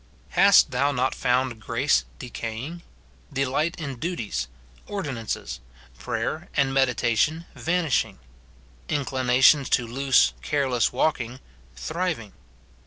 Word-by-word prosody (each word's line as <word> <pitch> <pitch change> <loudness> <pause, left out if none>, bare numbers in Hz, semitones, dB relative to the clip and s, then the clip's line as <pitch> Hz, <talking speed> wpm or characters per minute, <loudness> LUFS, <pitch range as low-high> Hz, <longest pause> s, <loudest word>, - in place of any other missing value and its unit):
Hast - - +6
thou 140 +1 +2
not 130 -1 0
found 125 -2 0
grace 125 +6 +1
decaying; 125 +7 -6 0.5
delight 135 +5 0
in 140 -6 -5
duties, 165 - -3 0.4
ordinances, 135 - -4 0.4
prayer 160 +4 -3
and 135 -2 +2
meditation, 135 +4 +1
vanishing; 160 - 0 0.7
inclina 130 -3 0
tions 140 -2 +6
to 125 - +2
loose 135 +3 +3
careless 135 -5 +1
walking, 130 -5 -1 0.4
thriving 160 - -3
130 Hz, 100 wpm, -25 LUFS, 120-150 Hz, 0.7 s, Hast